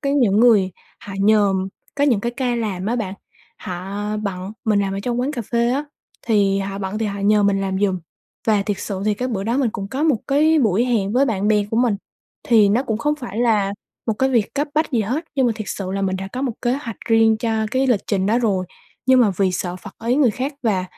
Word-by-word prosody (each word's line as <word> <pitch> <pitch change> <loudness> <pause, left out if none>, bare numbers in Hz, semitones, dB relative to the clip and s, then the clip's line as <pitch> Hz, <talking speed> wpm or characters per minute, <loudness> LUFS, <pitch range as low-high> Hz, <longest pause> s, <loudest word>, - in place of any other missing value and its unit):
có 275 - -1
những 245 -9 +3
người 210 -6 +5 0.3
họ 200 - -9
nhờ 205 -1 +4 0.4
có 285 - +2
những 240 -8 +3
cái 235 +2 -2
ca 250 -1 -1
làm 205 -5 -3
á 235 +3 0
bạn, 200 -4 -3 0.4
họ 185 +3 -5 0.2
bận, 195 -2 -4
mình 210 -2 +2
làm 195 -1 -1
ở 195 - -3
trong 240 +3 -1
quán 275 +4 -1
cà 240 -5 -3
phê 235 +2 0
á, 280 +3 0 0.4
thì 200 -4 +3
họ 195 0 -4
bận 195 +2 -3
thì 220 - -1
họ 200 0 -4
nhờ 210 +1 +3
mình 200 -1 +2
làm 190 -1 -1
giùm 195 -2 +1 0.5
và 210 -3 +3
thiệt 200 -1 -2
sự 195 -2 -4
thì 210 0 +2
cái 250 +5 -3
bữa 195 -5 -3
đó 230 +4 0
mình 255 -5 +2
cũng 195 -1 -5
có 270 +6 -3
một 305 -7 +3
cái 310 +3 +3
buổi 225 -3 +2
hẹn 215 -5 0
với 260 +4 +4
bạn 210 -5 0
bè 210 -1 +3
của 225 - -1
mình, 235 -3 +2 0.5
thì 220 -4 +6
nó 225 +6 +2
cũng 220 -5 -2
không 295 +5 +1
phải 235 -7 -7
là 215 -5 +2 0.3
một 225 - +1
cái 265 0 +2
việc 235 -5 +1
cấp 290 +2 -1
bách 310 -1 +1
gì 235 - +2
hết, 255 +11 -2
nhưng 265 -3 +2
mà 235 - +2
thiệt 215 - -5
sự 190 -2 -4
là 195 - -2
mình 190 -1 0
đã 195 +1 -5
có 255 - -3
một 260 -4 0
kế 240 - +2
hoạch 250 -6 -4
riêng 225 -1 +4
cho 220 -1 -1
cái 260 +2 +1
lịch 240 -6 +2
trình 195 -2 0
đó 225 +4 +3
rồi, 195 -6 0 0.4
nhưng 260 -1 +6
mà 220 - +4
vì 190 -2 +2
sợ 180 0 -3
phật 195 +2 -10 0.2
ý 250 - +3
người 275 -5 +4
khác 265 +6 -3
và 195 -5 +1
220 Hz, 255 wpm, -21 LUFS, 200-245 Hz, 0.5 s, thì